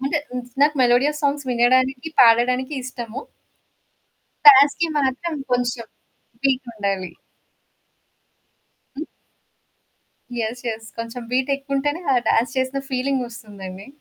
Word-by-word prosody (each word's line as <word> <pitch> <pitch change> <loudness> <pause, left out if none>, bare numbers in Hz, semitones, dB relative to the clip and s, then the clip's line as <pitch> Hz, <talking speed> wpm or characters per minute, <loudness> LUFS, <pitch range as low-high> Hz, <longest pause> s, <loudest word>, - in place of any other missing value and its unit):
అంటే 290 +2 +1
హ్మ్, 250 0 -4 0.2
నాకు 295 +1 +4
మెలోడియా 250 +4 +3
సాంగ్స్ 285 -1 0
వినడానికి, 255 +3 +2
పాడడానికి 250 +3 +4
ఇష్టము. 245 -1 -6 1.3
డాన్స్‌కి 285 +4 +8
మాత్రం 285 +4 -1 0.2
కొంచెం 245 -1 -1 0.6
పీకుండాలి. 220 -9 -1 1.9
హ్మ్. 305 - -4 1.3
యెస్. 235 +2 -3
యెస్. 225 0 -5
కొంచెం 230 +2 -6
బీటేక్కుంటేనే 275 +3 -1
ఆ - - +3
డాన్స్ 230 +1 +2
చేసిన 260 +1 -1
ఫీలింగ్ 260 +1 0
వస్తుందండి. 200 -4 -10
255 Hz, 95 wpm, -22 LUFS, 235-275 Hz, 1.9 s, డాన్స్‌కి